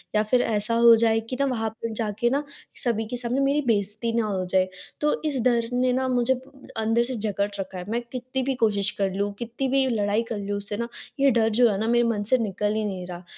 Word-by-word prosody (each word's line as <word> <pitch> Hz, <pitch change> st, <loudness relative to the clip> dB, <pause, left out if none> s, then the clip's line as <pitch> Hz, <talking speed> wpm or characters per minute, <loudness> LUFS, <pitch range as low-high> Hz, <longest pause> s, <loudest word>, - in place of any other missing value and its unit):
या 210 Hz, -, +4 dB
फिर 245 Hz, +3 st, +2 dB
ऐसा 215 Hz, 0 st, 0 dB
हो 235 Hz, 0 st, +8 dB
जाए 225 Hz, 0 st, +3 dB
कि 255 Hz, -, -3 dB
ना -, -, +3 dB
वहाँ 225 Hz, -4 st, -1 dB
पे 230 Hz, -1 st, -3 dB
जा 220 Hz, -1 st, -2 dB
के 240 Hz, -, +3 dB
ना 280 Hz, +4 st, 0 dB, 0.4 s
सभी 225 Hz, -3 st, 0 dB
के 245 Hz, -, -4 dB
सामने 245 Hz, +2 st, -1 dB
मेरी 280 Hz, +2 st, +2 dB
बेइज़्ज़ती 215 Hz, +1 st, 0 dB
ना 230 Hz, -, +2 dB
हो 190 Hz, -3 st, -2 dB
जाए। 185 Hz, +1 st, +2 dB, 0.3 s
तो 300 Hz, 0 st, +1 dB
इस 280 Hz, -5 st, 0 dB
डर 235 Hz, -2 st, +2 dB
ने 250 Hz, 0 st, +2 dB
ना 260 Hz, +1 st, 0 dB
मुझे 250 Hz, 0 st, +2 dB, 0.4 s
अंदर 225 Hz, +1 st, +2 dB
से 255 Hz, +1 st, -2 dB
जकड़ 205 Hz, -2 st, -1 dB
रखा 190 Hz, -1 st, -5 dB
है। 180 Hz, -, -5 dB
मैं 235 Hz, +1 st, 0 dB
कित्ती 255 Hz, +1 st, -3 dB
भी 265 Hz, +1 st, -1 dB
कोशिश 205 Hz, -1 st, +1 dB
कर 195 Hz, -1 st, +1 dB
लूँ, 200 Hz, +1 st, -1 dB
कित्ती 240 Hz, +3 st, -3 dB
भी 265 Hz, 0 st, +2 dB
लड़ाई 210 Hz, -1 st, +1 dB
कर 225 Hz, -, -1 dB
लूँ 205 Hz, 0 st, -3 dB
उससे 205 Hz, +1 st, -4 dB
ना 235 Hz, +1 st, -2 dB, 0.3 s
ये 275 Hz, 0 st, +5 dB
डर 225 Hz, -2 st, +3 dB
जो 235 Hz, +2 st, +4 dB
है 195 Hz, -, -1 dB
ना 220 Hz, -, -1 dB
मेरे 240 Hz, +1 st, +3 dB
मन 215 Hz, -3 st, 0 dB
से -, -, +7 dB
निकल 210 Hz, -2 st, -1 dB
ही 220 Hz, -, 0 dB
नहीं 190 Hz, -3 st, -4 dB
रहा। 175 Hz, 0 st, -8 dB
230 Hz, 250 wpm, -25 LUFS, 205-250 Hz, 0.4 s, हो